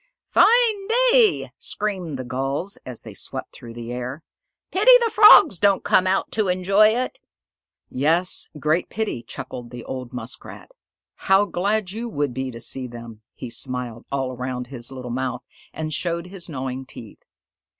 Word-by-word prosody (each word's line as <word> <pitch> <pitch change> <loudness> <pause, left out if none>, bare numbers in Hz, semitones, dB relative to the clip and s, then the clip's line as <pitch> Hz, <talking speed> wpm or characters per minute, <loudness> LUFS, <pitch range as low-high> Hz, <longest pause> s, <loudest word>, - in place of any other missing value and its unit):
"Fine 445 -4 +4 0.2
day!" 480 -3 +3
screamed 185 -8 -3
the 130 - -5
Gulls, 135 +9 -3
as 125 -3 -5
they - - -10
swept - - -5
through 115 -1 -11
the 120 0 -6
air. 125 +5 -5 0.5
"Pity 405 +6 +3
the 470 -2 0
Frogs 410 - +8
don't 200 -2 +3
come 185 - +3
out 190 +1 0
to 215 -2 0
enjoy 190 +3 +4
it!" 250 - -1 0.7
"Yes, 165 +7 0
great 155 +4 0
pity," 215 - -3
chuckled 120 +1 -8
the 120 -1 -9
old 130 -2 -6
Muskrat. 125 - -7 0.6
"How 195 +1 +6
glad 200 +1 -1
you 230 +3 -5
would 145 - -2
be 130 +1 -3
to 115 -2 -9
see 130 +2 -2
them!" 115 -2 -10
He 125 - -8
smiled 125 -1 -3
all 135 -2 -1
around 125 0 -4
his 120 -2 -7
little 125 -2 -7
mouth 125 0 -3 0.3
and 155 -1 -5
showed 170 +1 -2
his 180 -1 -8
gnawing 130 -2 -5
teeth. 110 -4 -11
140 Hz, 160 wpm, -22 LUFS, 125-195 Hz, 0.7 s, Frogs